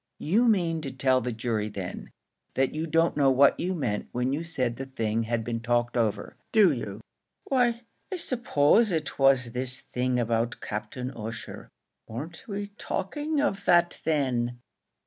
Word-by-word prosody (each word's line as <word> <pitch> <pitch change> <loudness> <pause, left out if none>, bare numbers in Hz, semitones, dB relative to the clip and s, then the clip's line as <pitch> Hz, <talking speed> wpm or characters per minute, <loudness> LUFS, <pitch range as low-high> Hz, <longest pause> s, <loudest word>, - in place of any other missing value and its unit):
"You 220 +10 +2
mean 170 -7 +2
to 140 - -4
tell 130 0 +2
the 125 +1 -2
jury 110 -2 -2
then 95 -3 -6 0.5
that 135 0 +1
you 155 +2 -2
don't 165 +1 +2
know 140 -2 +4
what 135 +2 +5
you 185 +2 -1
meant 115 -10 -2
when 125 +2 0
you 155 +4 -2
said 130 -8 -1
the 135 - -5
thing 115 -4 -1
had 115 0 -1
been 115 0 -2
talked 120 +1 0
over; 115 -4 -1
do 210 -6 +6
you?" 110 -5 -5 0.4
"Why, 240 -3 +1 0.3
I - - -1
s'pose 230 - +3
it 155 -5 -2
was 135 -3 +4
this 125 +1 -3
thing 125 0 +1
about 115 +1 0
Captain 110 +5 -5
Ussher. 115 -2 -7 0.4
Weren't 150 +9 -7
we 205 -1 -4
talking 295 +10 -2
of 205 -9 -1
that 175 -1 +3
then?" 125 -6 0
130 Hz, 165 wpm, -27 LUFS, 120-170 Hz, 0.5 s, do